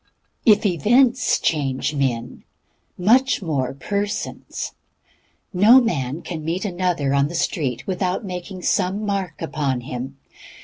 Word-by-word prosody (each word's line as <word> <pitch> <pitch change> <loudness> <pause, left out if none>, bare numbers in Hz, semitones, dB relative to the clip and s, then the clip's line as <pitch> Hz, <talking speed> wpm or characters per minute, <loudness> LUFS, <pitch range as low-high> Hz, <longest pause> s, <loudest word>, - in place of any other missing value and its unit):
If 215 0 +6
events 235 - +3
change 145 -2 0
men, 125 -5 -2 0.5
much 235 +5 +3
more 135 -6 -1
persons. 200 +8 -4 0.8
No 215 +8 +7
man 155 - -2
can 160 -3 -6
meet 170 +6 -2
another 175 -7 0
on 140 0 +3
the 170 - -7
street 145 -6 -1
without 185 +1 -2
making 180 0 -6
some 200 +4 0
mark 195 -6 -3
upon 140 -6 -1
him. 130 +2 -6
175 Hz, 120 wpm, -22 LUFS, 140-200 Hz, 0.8 s, No